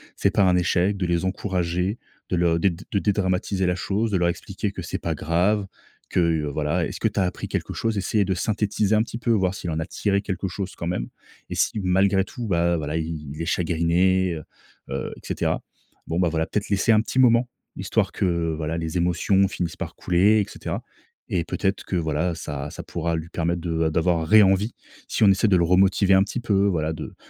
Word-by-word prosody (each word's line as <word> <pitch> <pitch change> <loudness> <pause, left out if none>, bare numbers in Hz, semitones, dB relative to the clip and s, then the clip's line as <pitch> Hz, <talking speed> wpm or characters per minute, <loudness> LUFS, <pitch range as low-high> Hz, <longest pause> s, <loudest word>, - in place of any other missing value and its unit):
c'est - - +1
pas 100 - +3
un 90 -1 +4
échec 90 +2 +2
de 95 -2 -2
les 85 +1 0
encourager 95 +1 -1 0.3
de 90 - 0
le 85 -1 +2
dé 95 +4 +3
de 95 +3 -3
dédramatiser 95 -1 0
la 90 0 +1
chose 105 +4 -1
de 95 - +2
leur 85 0 +2
expliquer 95 +3 -4
que 95 - -7
c'est 85 - -4
pas - - -2
grave. 95 +5 +1 0.4
Que 85 -3 +1
voilà 75 +4 -1
est-ce - - -6
que - - +2
tu - - -1
as - - +3
appris 90 0 -3
quelque - - -3
chose 115 -2 -1
essayer 100 +1 +1
de 95 - 0
synthétiser 105 +2 0
un 105 - +4
petit 115 - -7
peu 120 -1 0
voir 95 -4 +2
s'il 90 - -5
en 80 - -2
a 80 - -2
tiré 100 +1 0
quelque 95 -1 -3
chose 95 +1 -5
quand 85 - -5
même 75 -9 -2 0.4
et - - -4
si - - +1
malgré 95 +1 +3
tout 120 +1 -6
bah 85 -2 +2
voilà 75 -1 -2
i 80 - 0
i 75 -3 -6
il 75 - -7
est - - -2
chagriné, 90 +2 +2
heu 75 - -7 0.5
heu, - - -4
et - - -16
cetera - - -1 0.5
bon 85 - -1
bah 90 - +3
voilà 80 0 0
peut-être 105 0 -2
laisser 100 +3 +2
un 110 - +6
petit 115 - -5
moment 120 -1 +5 0.3
histoire - - 0
que - - -1 0.3
voilà 80 +1 -2
les 80 +1 -3
émotions 90 +3 +2
finissent 85 -3 -4
par - - -6
couler 100 +5 +3
et - - -1
cetera, - - -5 0.5
et 85 -3 0
peut-être 95 +2 -2
que - - -3
voilà 80 +1 0
ça 75 -3 -5
ça - - -8
pourra 85 0 -2
lui 80 0 -5
permettre 85 0 -1
de 80 -2 -1
a - - +2
d'avoir 80 0 +1
ré-envie 105 +2 +5 0.3
si - - 0
on 105 - +7
essaie 100 +3 +3
de 95 - +4
le 85 - +3
remotiver 95 +2 +4
un 95 0 +6
petit 105 +5 -4
peu 100 -4 +2
voilà 80 -4 0
de 80 - -7
90 Hz, 225 wpm, -24 LUFS, 85-100 Hz, 0.5 s, on